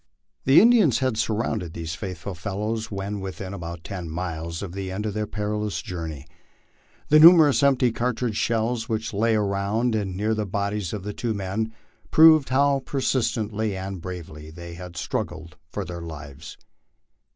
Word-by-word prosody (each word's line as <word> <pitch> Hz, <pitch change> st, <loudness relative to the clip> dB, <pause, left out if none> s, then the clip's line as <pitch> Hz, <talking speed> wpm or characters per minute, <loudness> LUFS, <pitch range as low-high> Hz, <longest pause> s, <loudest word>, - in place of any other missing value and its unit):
The 135 Hz, -, +7 dB
Indians 220 Hz, -, +5 dB
had 130 Hz, -3 st, 0 dB
surrounded 110 Hz, -6 st, -1 dB
these 80 Hz, -1 st, -5 dB
faithful 95 Hz, 0 st, -6 dB
fellows 105 Hz, +6 st, -3 dB
when 100 Hz, 0 st, -4 dB
within 95 Hz, 0 st, -6 dB
about 85 Hz, -3 st, -7 dB
ten 90 Hz, -4 st, -6 dB
miles 85 Hz, 0 st, -4 dB
of 95 Hz, -, -6 dB
the 95 Hz, 0 st, -5 dB
end 105 Hz, +3 st, -3 dB
of 105 Hz, -, -2 dB
their 105 Hz, 0 st, -2 dB
perilous 105 Hz, 0 st, -2 dB
journey. 80 Hz, -5 st, -6 dB, 0.8 s
The 155 Hz, -, +7 dB
numerous 160 Hz, -3 st, +8 dB
empty 135 Hz, -3 st, +4 dB
cartridge 120 Hz, -1 st, -1 dB
shells 115 Hz, +1 st, 0 dB
which 110 Hz, -1 st, -2 dB
lay 110 Hz, +2 st, +2 dB
around 105 Hz, +3 st, 0 dB
and 100 Hz, -4 st, -2 dB
near 110 Hz, +2 st, +1 dB
the 105 Hz, -1 st, -2 dB
bodies 100 Hz, -1 st, -2 dB
of 105 Hz, -3 st, -5 dB
the 105 Hz, 0 st, -4 dB
two 115 Hz, 0 st, -2 dB
men, 100 Hz, +3 st, -2 dB, 0.4 s
proved 155 Hz, -3 st, +7 dB
how 140 Hz, +1 st, +3 dB
persistently 110 Hz, -6 st, -1 dB
and 95 Hz, -1 st, -5 dB
bravely 80 Hz, -4 st, -8 dB
they 85 Hz, +1 st, -9 dB
had 85 Hz, 0 st, -9 dB
struggled 80 Hz, -2 st, -4 dB
for 100 Hz, +3 st, -4 dB
their 85 Hz, -1 st, -6 dB
lives. 75 Hz, -2 st, -9 dB
105 Hz, 160 wpm, -24 LUFS, 90-115 Hz, 0.8 s, numerous